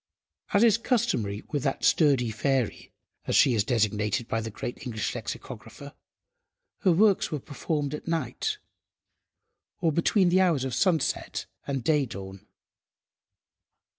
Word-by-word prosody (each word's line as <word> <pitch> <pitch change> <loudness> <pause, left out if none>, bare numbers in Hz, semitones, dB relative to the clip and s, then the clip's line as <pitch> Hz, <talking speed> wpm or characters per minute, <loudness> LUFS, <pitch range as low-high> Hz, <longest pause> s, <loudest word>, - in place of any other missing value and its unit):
As 205 +1 +4
is 230 -1 +5
customary 210 - 0
with 145 -3 -1
that 135 0 -2
"sturdy 135 -7 +3
fairy," 130 +2 -1 0.4
as - - +1
she 130 - +5
is 105 -3 +2
designated 110 0 0
by 115 - -1
the 110 - -5
great 115 +3 -6
English 115 -4 -3
Lexicographer, 120 +3 -8 0.9
her 190 - +3
works 200 +3 +3
were 150 - -2
performed 145 +1 -3
at 150 - -7
night, 170 - -2 1.2
or 170 -4 +2
between 175 +4 +3
the 185 +2 +4
hours 165 -8 +2
of 130 - -3
sunset 165 +1 0 0.2
and 135 -3 -2
day–dawn. 105 -10 -2
140 Hz, 130 wpm, -27 LUFS, 115-170 Hz, 1.2 s, is